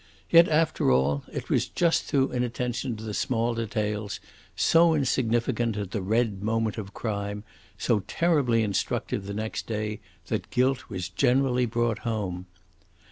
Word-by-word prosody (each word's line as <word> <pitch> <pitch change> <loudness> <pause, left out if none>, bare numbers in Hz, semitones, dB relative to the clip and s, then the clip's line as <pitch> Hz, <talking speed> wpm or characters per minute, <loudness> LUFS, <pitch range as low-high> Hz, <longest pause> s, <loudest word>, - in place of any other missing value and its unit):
Yet, 170 +1 +7
after 155 - +2
all, 70 +3 +2
it - - -5
was - - +2
just 170 -1 +1
through 135 -2 +1
inattention 125 0 -2
to 110 - -9
the 110 -1 -5
small 115 +1 0
details, 105 -2 -2 0.4
so 165 0 +4
insignificant 120 -4 0
at 100 -3 -4
the 105 - -2
red 105 0 0
moment 110 +1 -1
of 100 -2 -7
crime, 105 -2 -4 0.3
so 115 - +1
terribly 140 -10 +2
instructive 100 -1 -2
the 100 - -4
next 110 +1 -4
day, 105 -1 -3 0.3
that - - -3
guilt 130 +1 +1
was 95 -4 -4
generally 125 +6 +2
brought 115 -1 0
home. 95 -6 -3
115 Hz, 145 wpm, -27 LUFS, 105-125 Hz, 0.4 s, Yet